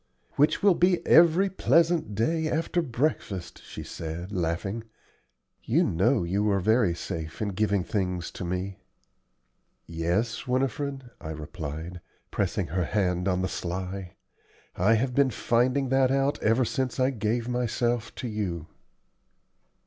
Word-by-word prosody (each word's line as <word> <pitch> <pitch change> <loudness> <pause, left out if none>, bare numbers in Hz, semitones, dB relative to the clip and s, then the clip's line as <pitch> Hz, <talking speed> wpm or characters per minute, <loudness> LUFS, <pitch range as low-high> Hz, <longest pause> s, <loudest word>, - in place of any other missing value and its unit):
"Which 150 +6 +2
will 200 -2 +7
be 180 +1 +2
every 170 +4 +6
pleasant 165 - +2
day 160 +9 +1
after 165 +3 0
breakfast," 120 - -2
she - - -8
said, 85 +4 -6
laughing. 95 +4 -2 0.8
"You - - +3
know 110 +7 +2
you 100 +5 0
are 100 -1 +2
very 105 -2 +3
safe 80 -2 -6
in 105 - -1
giving 100 -1 +1
things 90 -3 -2
to - - -7
me." 90 +2 -3 1.1
"Yes, 85 +10 -1
Winifred," 135 0 -1
I 80 - -6
replied, 80 +2 -6 0.3
pressing - - -1
her 90 0 0
hand 90 -1 0
on 90 -1 +1
the - - +1
sly; 90 +1 -5 0.6
"I 105 +6 +4
have 125 +3 0
been 140 +1 +4
finding 125 +3 +1
that 135 0 +3
out 135 +1 +1
ever 115 +4 +3
since 130 -1 -2
I 130 +1 +3
gave 115 0 -1
myself 120 -1 -1
to 125 - -4
you." 95 -8 -3
110 Hz, 135 wpm, -27 LUFS, 90-130 Hz, 1.1 s, will